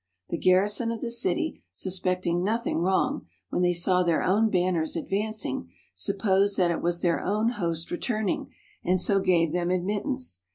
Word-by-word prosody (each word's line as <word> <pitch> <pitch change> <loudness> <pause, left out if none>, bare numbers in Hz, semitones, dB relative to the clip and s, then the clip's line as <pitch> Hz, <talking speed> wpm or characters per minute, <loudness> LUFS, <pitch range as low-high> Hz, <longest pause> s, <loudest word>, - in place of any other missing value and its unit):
The 170 - -2
garrison 205 +5 +3
of 230 - -4
the 235 - -3
city, 315 +7 -1
suspecting 180 -2 -1
nothing 225 -2 0
wrong, 190 +11 0 0.2
when - - -1
they 175 0 +2
saw 180 +1 +2
their 170 -2 +1
own 215 +4 +3
banners 180 -4 +1
advancing, 195 - -2 0.2
supposed 195 - +1
that 175 -2 +3
it 170 - -2
was 175 0 -1
their 170 -2 +1
own 215 +4 +1
host 170 -7 -3
returning, 215 +2 -2 0.3
and 185 +1 +2
so 195 +2 +4
gave 175 -4 +2
them 175 0 0
admittance. 205 - -1
185 Hz, 160 wpm, -26 LUFS, 175-210 Hz, 0.3 s, so